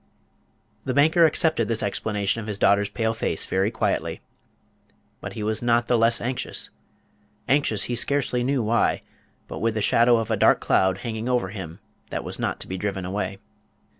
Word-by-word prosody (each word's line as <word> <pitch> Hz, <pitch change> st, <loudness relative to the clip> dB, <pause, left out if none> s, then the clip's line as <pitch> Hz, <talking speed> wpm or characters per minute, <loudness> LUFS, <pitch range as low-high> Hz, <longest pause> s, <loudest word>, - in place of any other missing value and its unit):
The 130 Hz, -, -3 dB
banker 160 Hz, +3 st, +5 dB
accepted 160 Hz, +1 st, +1 dB
this 115 Hz, -1 st, 0 dB
explanation 105 Hz, +1 st, -1 dB
of 110 Hz, -, -8 dB
his 105 Hz, -2 st, -3 dB
daughter's 100 Hz, 0 st, +3 dB
pale 110 Hz, +1 st, -1 dB
face 115 Hz, -, -1 dB
very 95 Hz, +2 st, 0 dB
quietly; 115 Hz, -, -2 dB, 1.0 s
but -, -, -7 dB
he 105 Hz, -, -5 dB
was 110 Hz, +1 st, -1 dB
not 120 Hz, -1 st, +2 dB
the 120 Hz, -, +1 dB
less 115 Hz, 0 st, +3 dB
anxious 125 Hz, +1 st, -4 dB, 0.8 s
anxious 130 Hz, -7 st, +2 dB
he 125 Hz, -, -3 dB
scarcely 125 Hz, 0 st, +1 dB
knew 130 Hz, -1 st, 0 dB
why, 115 Hz, +2 st, +1 dB, 0.4 s
but -, -, -7 dB
with 115 Hz, +1 st, 0 dB
the 110 Hz, -, -1 dB
shadow 120 Hz, +2 st, +4 dB
of 115 Hz, 0 st, -2 dB
a -, -, +3 dB
dark -, -, +4 dB
cloud 95 Hz, 0 st, +2 dB
hanging 115 Hz, +1 st, -3 dB
over 120 Hz, -7 st, 0 dB
him 95 Hz, -2 st, -8 dB, 0.3 s
that -, -, -4 dB
was -, -, -5 dB
not -, -, -2 dB
to -, -, -5 dB
be 95 Hz, 0 st, -5 dB
driven 95 Hz, -2 st, -3 dB
away. 95 Hz, +1 st, -3 dB
115 Hz, 180 wpm, -24 LUFS, 100-125 Hz, 1.0 s, banker